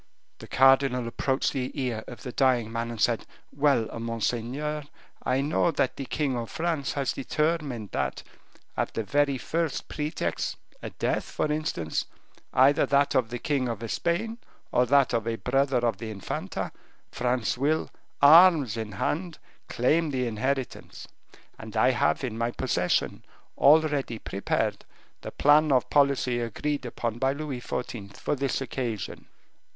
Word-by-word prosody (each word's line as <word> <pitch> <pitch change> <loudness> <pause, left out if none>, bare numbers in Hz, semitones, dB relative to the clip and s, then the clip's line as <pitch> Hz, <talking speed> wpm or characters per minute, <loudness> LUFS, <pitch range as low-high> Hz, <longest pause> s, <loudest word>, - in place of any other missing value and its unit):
The - - -10
cardinal 135 -2 +4
approached 130 +3 0
the 130 -2 -2
ear 120 -4 -2
of 120 -3 -10
the 125 - -5
dying 125 -4 +2
man, 115 0 -2
and 115 -2 -6
said, 115 +1 +1 0.2
"Well, 140 -5 +2
monseigneur, 120 +6 -2 0.4
I 130 +1 +1
know 150 +4 +2
that 135 - 0
the 135 - -5
king 140 -1 -1
of 115 -2 -4
France 160 -4 -2
has 140 -3 -1
determined 145 - -1
that, - - -2 0.5
at - - -2
the 115 - -1
very 140 +5 +1
first 165 +3 -2
pretext, 150 0 -2 0.2
a - - -5
death - - -1
for 150 - -2
instance, 150 - -2 0.5
either 135 +3 +4
that 140 0 +3
of 125 -3 +2
the 120 - -4
king 130 -1 -1
of 115 0 -4
Spain, 220 +7 -1 0.3
or 125 - +3
that 140 0 +4
of 115 -1 0
a 115 - 0
brother 135 +3 +1
of 115 - 0
the 115 - -5
Infanta, 100 -3 -4 0.4
France 125 -2 0
will, 145 +5 0 0.3
arms 155 - +7
in 110 -2 -4
hand, 165 - -2 0.3
claim 155 +7 +2
the 130 -3 -1
inheritance, 130 +4 -3 0.5
and - - -7
I - - +5
have 80 - +1
in 115 -3 -3
my 115 0 +1
possession, 120 -8 0 0.3
already 145 -5 +4
prepared, 100 -2 -2 0.4
the - - -6
plan 150 +1 +4
of 130 -2 +2
policy 140 -4 +3
agreed 130 +4 -2
upon 115 -1 -3
by 135 +1 +2
Louis 140 -4 -5
XIV. 100 -6 -5
for - - -1
this 135 0 -1
occasion." 120 -6 -4
130 Hz, 150 wpm, -27 LUFS, 115-145 Hz, 0.5 s, arms